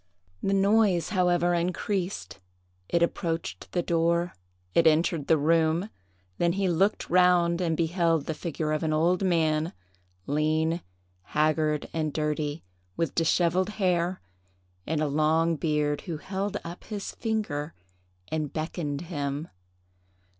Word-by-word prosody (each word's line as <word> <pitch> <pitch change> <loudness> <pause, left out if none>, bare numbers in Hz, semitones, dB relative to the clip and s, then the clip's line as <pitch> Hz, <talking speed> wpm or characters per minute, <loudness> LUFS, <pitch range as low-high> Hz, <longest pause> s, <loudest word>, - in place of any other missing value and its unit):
The 195 - +1
noise, 200 -3 +3
however, 175 -2 +2
increased; 175 - -2 0.5
it 170 0 +3
approached 165 -1 -3
the 175 - 0
door; 170 +1 +1 0.4
it 165 - +5
entered 160 -1 +2
the 160 - +5
room; 165 +5 +2 0.5
then 170 0 +2
he 195 0 0
looked 190 +5 +1
round, 180 -1 +4
and 165 -3 0
beheld 165 -2 +1
the 160 - -2
figure 155 0 -3
of 155 - 0
an 155 -1 0
old 175 +4 +2
man, 160 -3 +1 0.5
lean, 155 +3 +1 0.4
haggard, 155 - +1
and 155 -2 -1
dirty, 150 0 -2 0.3
with 165 - -1
dishevelled 175 +3 +2
hair, 180 -3 0 0.6
and 155 0 0
a 155 - +1
long 160 +3 +2
beard, 150 -2 0
who 165 -4 -5
held 195 +5 -3
up 170 +1 -8
his 205 -3 -5
finger 205 -10 -3 0.5
and 155 -2 -2
beckoned 155 -2 -3
him. 145 -3 -4
165 Hz, 125 wpm, -27 LUFS, 155-180 Hz, 0.6 s, it